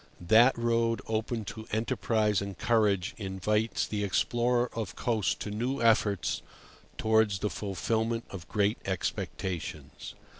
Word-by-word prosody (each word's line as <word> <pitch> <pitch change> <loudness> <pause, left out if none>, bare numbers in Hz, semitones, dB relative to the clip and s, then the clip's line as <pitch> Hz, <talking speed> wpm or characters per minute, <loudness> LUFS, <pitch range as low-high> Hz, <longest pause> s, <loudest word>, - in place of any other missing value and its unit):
That 115 +9 +5
road 115 -1 +1
open 110 0 -2
to 110 0 -9
enterprise 110 -2 +1
and 100 -1 -5
courage 105 -5 +2
invites 105 +3 0
the 105 -1 -2
explorer 120 +4 +1
of 110 -4 -4
coasts 110 -4 0
to 105 - -6
new 125 +6 -2
efforts 110 -4 +2 0.6
towards 110 -2 +3
the 105 +2 -2
fulfilment 110 +4 -1
of 90 -4 -8
great 105 +1 +1
expectations. 85 -5 -4
110 Hz, 120 wpm, -29 LUFS, 100-115 Hz, 0.6 s, That